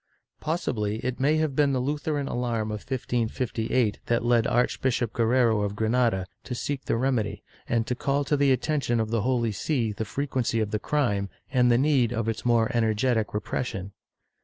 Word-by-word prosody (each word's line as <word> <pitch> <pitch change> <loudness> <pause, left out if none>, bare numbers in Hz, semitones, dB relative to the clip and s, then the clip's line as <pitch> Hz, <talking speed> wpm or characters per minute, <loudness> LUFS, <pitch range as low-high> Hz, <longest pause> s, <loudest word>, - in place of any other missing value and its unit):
Possibly 120 - -1
it 130 0 -2
may 145 +4 +3
have 155 -3 0
been 145 -1 +3
the 130 - +1
Lutheran 145 +1 -1
alarm 115 -4 -1
of 105 - -3
1558 120 -2 -1
that 120 0 +1
led 120 -2 +3
Archbishop 125 -1 +1
Guerrero 115 -2 +3
of 100 0 -2
Granada 110 -3 +1 0.2
to 125 - -5
seek 135 +2 -3
the - - 0
remedy 110 -5 -1 0.3
and 115 -1 +1
to 125 - -1
call 140 +3 0
to 145 - +1
the 140 -1 +3
attention 130 -2 +1
of 110 0 -1
the 115 -2 +1
Holy 120 -1 +1
See 115 +1 -1
the 105 - -4
frequency 130 -2 -1
of 105 -2 -1
the 105 - 0
crime 105 -9 0 0.2
and 125 -2 +4
the 120 - +5
need 135 -4 +3
of 115 -1 -2
its 115 - -2
more 115 -2 +3
energetic 115 0 +1
repression. 100 -2 -3
120 Hz, 180 wpm, -26 LUFS, 110-130 Hz, 0.3 s, the